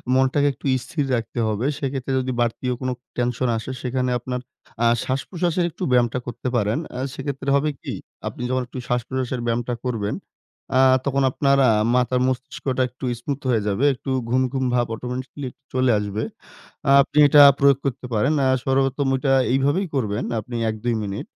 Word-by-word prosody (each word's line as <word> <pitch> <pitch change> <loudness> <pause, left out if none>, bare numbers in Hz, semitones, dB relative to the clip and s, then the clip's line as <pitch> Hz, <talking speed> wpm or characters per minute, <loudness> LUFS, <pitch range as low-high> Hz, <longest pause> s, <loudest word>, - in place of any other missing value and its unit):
মনটাকে 130 +2 +3
একটু - - -16 0.2
স্থির 145 -4 -2
রাখতে 115 +1 -4
হবে। 110 +3 -1
সেক্ষেত্রে 135 -1 -3
যদি 130 0 -2
বাড়তিও 120 +2 -1
কোন 130 - -1 0.3
টেনশন 120 0 0
আসে, 115 +4 -5
সেখানে 130 0 -1
আপনার, 125 +1 -4 0.4
আ - - +4 0.2
শ্বাসপ্রশ্বাসের 170 +6 -1
একটু 175 - -7
ব্যায়ামটা 125 0 +3
করতে 120 +1 -5
পারেন। 105 +2 +1 0.2
আ - - -3
সেক্ষেত্রে 140 0 -4
হবে 150 +2 +2
কী? - - -5 0.3
আপনি - - -6
যখন 130 0 +1
একটু 130 - -9
শ্বাসপ্রশ্বাসের 125 +1 -2
ব্যায়ামটা 120 +1 -1
করবেন, 110 -5 -1 0.6
আ - - +5 0.3
তখন 140 0 +1
আপনার, 140 0 +2
আ - - +5 0.2
মাথার 125 0 +2
মস্তিষ্কটা 130 0 -2
একটু 130 +2 -8
স্মুথ 140 +3 -4
হয়ে 115 -3 +2
যাবে। 105 +7 +1
একটু 135 +1 -6 0.2
ঘুম, 130 +2 +2
ঘুম, 130 -1 0
ভাব 120 -1 +2
অটোমেটিক্যালি 130 +3 -5 0.2
চলে 130 -1 +3
আসবে। 105 +1 -3 0.7
আ - - +6
আপনি 145 - -4
এটা 145 +1 +6
আ - - +7
প্রয়োগ 140 -2 +5
করতে 130 -2 -2
পারেন। 115 +8 +2
আ - - +3 0.2
সর্বপ্রথম 135 +1 +1
এটা 135 0 +1 0.2
এইভাবেই 145 +8 +1
করবেন। 110 -3 -1 0.2
আপনি 120 +2 -7
১-২ 110 +2 -2
মিনিট, 100 -1 -4
130 Hz, 170 wpm, -22 LUFS, 120-135 Hz, 0.7 s, আ